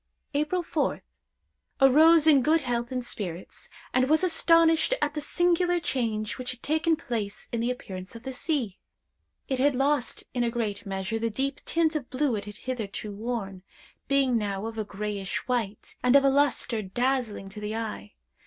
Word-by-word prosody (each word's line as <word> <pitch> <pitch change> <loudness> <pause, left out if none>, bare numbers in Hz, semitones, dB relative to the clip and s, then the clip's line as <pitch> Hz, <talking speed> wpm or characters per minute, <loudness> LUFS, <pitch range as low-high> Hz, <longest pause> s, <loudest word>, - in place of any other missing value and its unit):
"April 305 +5 0
4th. - - -1 0.8
Arose 310 +4 +6
in 295 -4 +6
good 310 +4 +3
health 240 -2 -2
and 250 -1 -3
spirits, 185 -6 -6 0.2
and 255 +1 +2
was 315 +3 +4
astonished 330 +3 +4
at 295 -7 0
the 300 - -3
singular 350 +2 +2
change 225 -7 -2
which 250 0 -4
had 250 - -6
taken 315 +2 +2
place 230 -10 -4
in 235 - -1
the 235 +2 0
appearance 190 -6 -6
of 230 - -10
the 265 0 -5
sea. 250 - -2 0.7
It 265 -2 -1
had 280 +1 +3
lost, 275 0 +1
in 245 - 0
a 235 - +1
great 210 -3 -3
measure, 195 +3 -2
the 230 0 0
deep 270 +5 -2
tint 325 -1 +1
of 285 -5 -3
blue 260 -2 0
it 205 -1 -4
had 205 0 -9
hitherto 220 -4 -5
worn, 200 -3 -4 0.5
being 270 -4 +3
now 200 -1 -3
of 225 0 -5
a - - 0
grayish 205 -1 -4
white, 225 -5 -2
and 250 +2 +4
of 280 - +7
a 275 - +5
lustre 270 -5 +2
dazzling 230 0 -1
to 210 +2 -9
the 210 +1 -3
eye. 215 - -5
250 Hz, 180 wpm, -27 LUFS, 215-290 Hz, 0.8 s, of